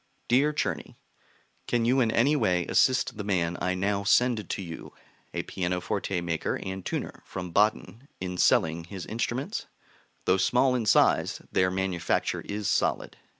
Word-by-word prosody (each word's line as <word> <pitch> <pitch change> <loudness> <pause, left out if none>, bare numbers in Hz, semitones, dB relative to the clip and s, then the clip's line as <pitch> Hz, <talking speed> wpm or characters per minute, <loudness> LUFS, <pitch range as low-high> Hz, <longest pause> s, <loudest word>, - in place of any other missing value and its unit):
DEAR 135 +5 +4
CZERNY, 150 - -3 0.7
Can 120 -1 +1
you 130 +3 +3
in 120 -3 +3
any 130 +7 +3
way 90 - +1
assist 130 -3 +2
the 105 - -4
man 90 -4 0
I 90 +1 0
now 100 +2 0
send 115 +1 +2
to - - -3
you 85 -2 -9 0.4
(a - - -3
pianoforte 90 0 -2
maker 85 -2 -2
and 95 0 -5
tuner - - -4
from 90 -2 -6
Baden) 110 +6 +1
in 90 -1 -4
selling 80 +1 +3
his 95 0 -7
instruments? 120 +4 -3 0.6
Though 95 - +4
small 125 +6 +3
in 120 -4 -1
size, - - +3
their 90 0 +3
manufacture 95 -2 -1
is 105 -1 -4
solid. - - 0
100 Hz, 150 wpm, -27 LUFS, 90-120 Hz, 0.7 s, DEAR